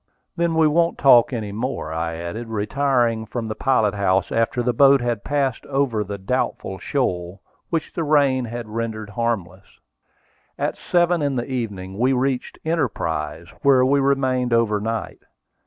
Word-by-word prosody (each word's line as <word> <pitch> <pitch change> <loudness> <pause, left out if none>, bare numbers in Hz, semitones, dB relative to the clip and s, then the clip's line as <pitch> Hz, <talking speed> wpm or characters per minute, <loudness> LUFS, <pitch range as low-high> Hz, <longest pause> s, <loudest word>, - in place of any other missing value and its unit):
"Then 170 -1 0
we 160 -1 +4
won't 170 +2 +2
talk 125 -4 +6
any 110 -5 -4
more," 110 - -4
I 80 0 -2
added, 85 +8 -6
retiring 115 +1 0
from 115 +1 -4
the 110 - -3
pilot 110 -5 +1
house 95 -2 +1
after 115 +2 0
the 125 0 +1
boat 140 +2 +6
had 120 -4 -2
passed 140 -4 -1
over 135 -6 0
the 100 0 -6
doubtful 95 -2 -2
shoal, 90 -8 -2 0.3
which 165 -2 -2
the 170 - -2
rain 140 -4 +3
had 120 0 -6
rendered 110 -1 -4
harmless. 100 -4 -3 0.8
At - - -1
seven 175 -1 +1
in 140 -2 0
the 120 -1 -1
evening 105 -7 -5
we 130 +2 +3
reached 130 0 -1
Enterprise, 85 - -2
where 130 -2 +5
we 140 +2 +3
remained 130 -3 +1
overnight. 115 -1 0
120 Hz, 155 wpm, -22 LUFS, 105-135 Hz, 0.8 s, talk